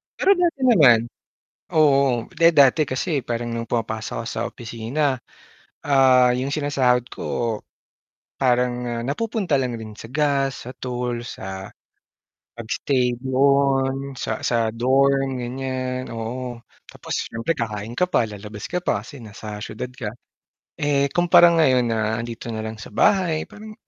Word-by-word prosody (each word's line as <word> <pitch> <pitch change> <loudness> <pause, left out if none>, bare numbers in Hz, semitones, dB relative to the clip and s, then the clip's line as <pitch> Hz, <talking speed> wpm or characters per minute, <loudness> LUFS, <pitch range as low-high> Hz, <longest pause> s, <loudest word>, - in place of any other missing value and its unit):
Pero 390 - +3
dati 345 -8 +2
naman 150 - +6 0.8
oo, 140 -6 +3
'di, 165 0 +4
dati 140 +2 +5
kasi 140 +3 -1
parang 120 -1 -4
nung 115 0 -4
pumapasok 110 -2 -3
ako - - -7
sa - - -3
opisina, 120 +4 -2 0.7
ah, 130 -3 +5
yung 130 +2 -2
sinasahod 135 -4 +1
ko 115 -3 -3 0.8
parang, 125 -1 +2
ah, 115 0 -3
napupunta 185 - -1
lang 125 -2 -2
rin 110 -1 -8
sa 115 +2 -11
gas, 140 -2 0
sa 125 - -7
toll, 125 -2 -4
sa 95 -5 -7 0.9
pag-stay 125 +2 0
doon 135 0 +1
sa - - -3
sa 115 -2 0
dorm 135 +2 +2
ganyan, 130 +1 -4
oo. 120 +2 -5 0.3
Tapos - - -8 0.2
siyempre 115 +9 -1
kakain 110 -2 -4
ka 180 +8 0
pa, 115 - +2
lalabas 105 0 -8
ka 180 0 -3
pa, 105 - -1
kasi 135 +1 -11
nasa 105 -1 -8
syudad 110 - -5
ka. 120 -4 -5 0.7
Eh, 140 -1 +1
kumpara 175 +2 +6
ngayon 130 -8 +3
na 110 -1 0
'andito 115 -1 -7
na 110 - -3
lang 110 0 -6
sa - - -11
bahay 185 -6 +3
parang 215 +1 -11
130 Hz, 140 wpm, -22 LUFS, 115-140 Hz, 0.9 s, naman